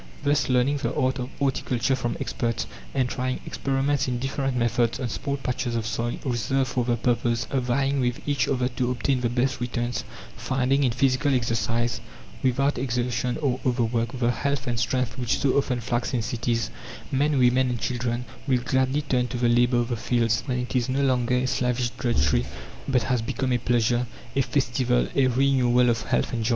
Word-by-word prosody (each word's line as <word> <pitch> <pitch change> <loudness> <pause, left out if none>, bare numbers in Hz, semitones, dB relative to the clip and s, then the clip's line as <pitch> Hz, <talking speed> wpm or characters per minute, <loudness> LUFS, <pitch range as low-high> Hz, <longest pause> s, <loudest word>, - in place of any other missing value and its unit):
Thus, 145 -2 +2
learning 130 +3 +3
the 140 - -2
art 130 0 +1
of 125 0 -4
horticulture 135 -2 0
from 120 -2 -2
experts, 115 -2 -2 0.3
and 130 -2 +2
trying 130 0 -2
experiments 135 +1 0
in 125 -1 -1
different 135 0 -2
methods 120 0 +1
on 125 -3 -2
small 140 +5 -3
patches 125 -2 -2
of 115 -1 -1
soil 120 +1 -2
reserved 130 +1 0
for 125 - 0
the 120 0 +1
purpose, 120 0 0
vying 135 +2 +1
with 125 -1 0
each 140 -3 +1
other 125 -1 +1
to 125 0 -1
obtain 125 +1 0
the 120 - +1
best 125 +2 0
returns, 120 0 -2 0.3
finding 135 +2 +1
in 130 - +3
physical 130 +3 +2
exercise, 115 0 0 0.4
without 135 +1 +1
exhaustion 125 -1 -1
or 130 -2 +1
overwork, 120 -1 0
the 120 -1 +2
health 140 +2 -1
and 120 -2 -1
strength 125 0 -1
which 120 -2 +1
so 135 - +1
often 130 -3 +1
flags 120 +3 -1
in 115 - 0
cities, 115 -1 -1 0.4
men, 145 +2 +2
women 130 +1 +4
and 120 -1 -2
children 120 0 -2 0.2
will 130 -2 +2
gladly 130 +3 +1
turn 125 -3 +1
to 125 - -4
the 120 0 +2
labour 120 +1 +3
of 120 0 0
the 120 - 0
fields, 115 -1 +1
when 125 -2 0
it 125 -2 -4
is 125 0 +1
no 135 +2 +1
longer 125 -2 +2
a 125 +1 +1
slavish 125 -1 0
drudgery, 70 - +1 0.4
but 125 -4 +2
has 125 -1 0
become 130 +3 -2
a 120 - +2
pleasure, 120 +1 +1 0.3
a 135 - +4
festival, 125 -2 +1
a 135 -2 +4
renewal 125 -1 +3
of 115 -1 -1
health - - 0
and 115 -1 -1
joy. 110 - 0
125 Hz, 190 wpm, -25 LUFS, 120-130 Hz, 0.4 s, women